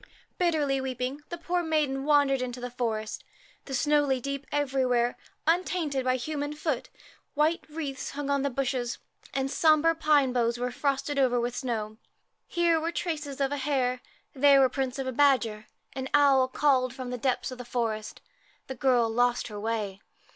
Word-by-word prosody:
Bitterly 300 -6 +1
weeping, 260 +2 -3
the 345 - -5
poor 350 +1 -1
maiden 300 -5 0
wandered 285 -3 +3
into 250 0 -4
the 245 0 -5
forest. 220 -3 -3 0.4
The 270 - -4
snow 295 +3 +3
lay 265 -2 +1
deep 275 +2 -5
everywhere, 260 -4 +1 0.3
undinted 325 -4 +1
by 255 0 +2
human 290 +3 -3
foot; 300 -3 -2 0.5
white 310 +3 +2
wreaths 295 -4 -5
hung 290 0 -5
on 280 -1 +1
the 280 - 0
bushes, 255 -2 -2 0.3
and 270 0 -1
the 270 - -5
sombre 315 0 +4
pine 295 -5 +3
boughs 235 -1 +1
were 250 +1 -2
frosted 280 +2 -1
over 250 -2 +3
with 240 +1 -2
snow. 220 -5 -3 0.5
Here 340 -1 +2
were 320 - -3
the 340 - -2
traces 295 -6 -3
of 275 0 +1
a 290 - -1
hare, 260 -3 0 0.3
there 275 0 +6
the 260 - +4
prints 265 -1 -2
of 270 - -3
a 260 - -2
badger. 235 -6 +2 0.3
An 265 +1 -4
owl 275 -3 +5
called 260 -2 +2
from 255 -2 -6
the 250 - -3
depths 260 +1 -1
of 255 - -8
the - - -5
forest. 225 -3 -3 0.4
The 265 - -5
girl 250 -2 +2
lost 240 +2 +1
her 210 -1 -7
way. 210 -3 -3
270 Hz, 180 wpm, -28 LUFS, 245-290 Hz, 0.5 s, there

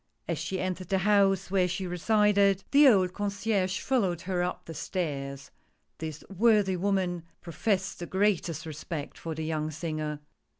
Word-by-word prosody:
" - - -45
As - - -2
she 190 - -3
entered 185 -1 -3
the 195 - +2
house 195 -3 +3
where 185 -2 +3
she 180 +2 -3
resided, 200 +1 +3
the 285 +1 +7
old 190 -7 +5
128 205 +3 -2
THE 200 - +4
PORTRAIT. 185 0 0
Concierge 185 - -2
followed 190 -10 +1
her 180 -1 -1
up 180 +1 -3
the 165 - -7
stairs. 145 -4 -4 0.5
This 155 -2 -6
worthy 205 -1 +3
woman 185 -2 0 0.2
professed 190 +2 -1
the 175 - -5
greatest 190 -4 0
respect 155 -1 -6
for 165 -1 -6
the 160 0 -4
young 155 -1 -1
singer. 155 -1 -4
185 Hz, 175 wpm, -28 LUFS, 160-200 Hz, 0.5 s, the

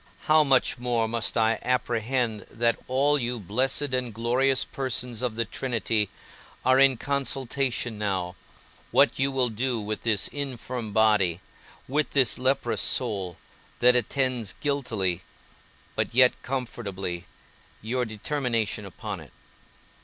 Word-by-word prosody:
How 155 0 +5
much 135 -2 +3
more 120 -2 +1
must 115 +1 -2
I 110 0 +3
apprehend 120 -2 0
that 115 0 +1
all 140 +3 +3
you 120 -1 -2
blessed 130 +8 0
and 125 -2 -1
glorious 125 +4 +1
persons 125 -3 -3
of 125 -4 -1
the 115 0 0
Trinity 115 -3 -1 0.6
are 130 +1 +5
in 135 -2 +6
consultation 135 -4 -2
now, 95 -4 -1 0.5
what - - +4
you 135 +1 +2
will 130 -2 +1
do 120 +2 -1
with 105 0 -4
this 110 -4 +1
infirm 125 -5 -5
body, 105 -5 +3 0.5
with 150 +3 0
this 130 -5 +3
leprous 130 +2 +1
soul, 100 -8 -1 0.4
that 125 0 +6
attends 125 -2 0
guiltily, 110 -11 -1 0.7
but - - -1
yet 125 0 +7
comfortably, 100 -9 -4 0.5
your 125 +4 -1
determination 115 -2 -2
upon 95 - -6
it. - - -13
120 Hz, 125 wpm, -26 LUFS, 110-130 Hz, 0.7 s, yet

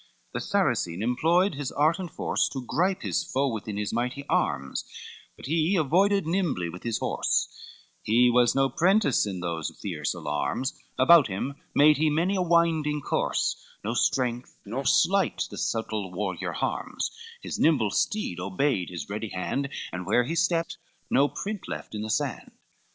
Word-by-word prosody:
LXXXIX 65 - -34
The - - -2
Saracen 85 +4 0
employed 165 - +2
his 140 -2 -4
art 155 +4 +2
and 180 -2 -4
force - - 0
To 130 -2 -6
grip 185 +8 0
his - - 0
foe 140 +2 0
within 105 -3 -4
his 105 -1 -2
mighty 125 +4 -2
arms, 70 -1 0 0.5
But - - -10
he 160 +6 +1
avoided 190 +5 +3
nimbly 160 - 0
with 90 +2 -9
his 115 -2 -1
horse, - - 0 0.5
He 120 +3 +4
was 120 -1 +4
no 135 0 +4
prentice 180 - +2
in 95 -3 -4
those 85 -3 -3
fierce 85 -6 -3
alarms, 80 - -2 0.2
About 155 +1 +7
him 105 +8 -3 0.2
made 150 +1 +6
he 155 +1 +3
many 170 +6 +1
a 185 - +1
winding 165 -4 +2
course, - - -1 0.2
No 110 +3 -2
strength, 125 0 0
nor 125 +7 -4
sleight 190 +5 +3
the - - -8
subtle 110 -4 -2
warrior 95 -1 -3
harms, - - -2 0.3
His - - -4
nimble 125 -11 +3
steed 210 - -1
obeyed 95 +2 0
his 85 -4 -6
ready 105 +2 -4
hand, 135 +10 -2 0.2
And 90 0 -5
where 120 +4 +3
he 145 +7 -3
stept 170 0 0 0.3
no 140 +2 +4
print 205 +5 -5
left - - -6
in 105 - -4
the 110 - -4
sand. - - -2
130 Hz, 165 wpm, -27 LUFS, 105-165 Hz, 0.5 s, About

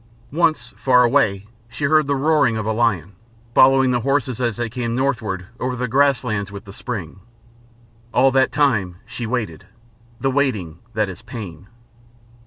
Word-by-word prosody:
Once, 165 -1 +1
far 125 -2 +4
away, 110 -6 +2 0.2
she 120 - -7
heard 155 0 +3
the 140 - +1
roaring 140 -5 +2
of 110 - -3
a 110 - 0
lion, 105 -6 0 0.4
following 135 0 +5
the 125 - +1
horses 130 -1 -1
as 120 -3 -1
they 120 0 -1
came 115 0 -3
northward 110 -9 -1
over 125 0 -2
the 125 +1 -2
grass 140 +2 +3
lands 100 -4 -3
with 100 -1 -9
the 100 - -11
spring. 100 -7 -6 0.9
All 135 +2 +4
that 130 0 +3
time 110 -11 +1
she 115 +1 -6
waited 110 -10 -3 0.5
the 135 +2 0
waiting 110 - -1 0.2
that 110 -1 +1
is 95 +2 -8
pain. 100 -6 -9
120 Hz, 165 wpm, -21 LUFS, 105-135 Hz, 0.9 s, following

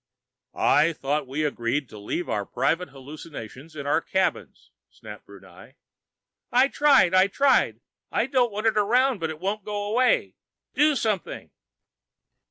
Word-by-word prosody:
"I 165 +2 +3
thought 145 -1 -2
we 140 +4 -3
agreed 140 -1 -2
to 105 - -11
leave 170 +12 -4
our 100 - -1
private 175 - -1
hallucinations 145 0 -11
in 140 -2 -6
our 145 +3 +1
cabins," 190 +2 -2 0.2
snapped - - -13
Brunei. - - -15 0.8
"I 255 +3 +4
tried! 280 -13 +4
I 185 +1 +5
tried! 275 +7 +2 0.3
I - - +1
don't 255 -3 +1
want 210 +2 -5
it 220 -1 +3
around, 245 +3 +2
but 165 -1 -2
it 155 -1 -7
won't 200 +3 -3
go 205 0 -4
away! 240 +5 +1 0.4
Do 300 0 +3
something!" 215 -7 -3
185 Hz, 145 wpm, -25 LUFS, 150-230 Hz, 0.8 s, I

